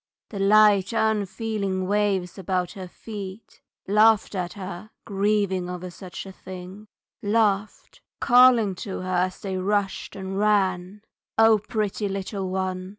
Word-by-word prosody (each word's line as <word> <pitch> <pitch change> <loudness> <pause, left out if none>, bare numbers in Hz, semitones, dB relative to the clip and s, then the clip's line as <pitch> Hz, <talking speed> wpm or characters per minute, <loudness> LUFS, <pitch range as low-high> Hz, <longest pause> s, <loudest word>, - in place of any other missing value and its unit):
The 200 - -6
light 205 0 +5
unfeeling 210 -3 -1
waves 195 -2 0
about 180 -1 -1
her 190 -2 -8
feet 200 +1 -9 0.3
Laughed 215 +2 +4
at 180 -2 -3
her 190 +1 -8 0.2
grieving 200 -3 0
over 180 0 -6
such 185 +1 -9
a 195 - -9
thing 185 +2 -10 0.3
Laughed, 210 -1 0 0.2
calling 245 -4 +5
to 195 -3 -5
her 185 - -6
as 185 +1 0
they 190 -2 -3
rushed 200 +1 -1
and 190 0 -4
ran, 200 -1 +1 0.3
"O 225 -1 +6
pretty 210 -1 -2
little 195 0 -4
one! 185 0 -3
195 Hz, 130 wpm, -24 LUFS, 185-210 Hz, 0.3 s, O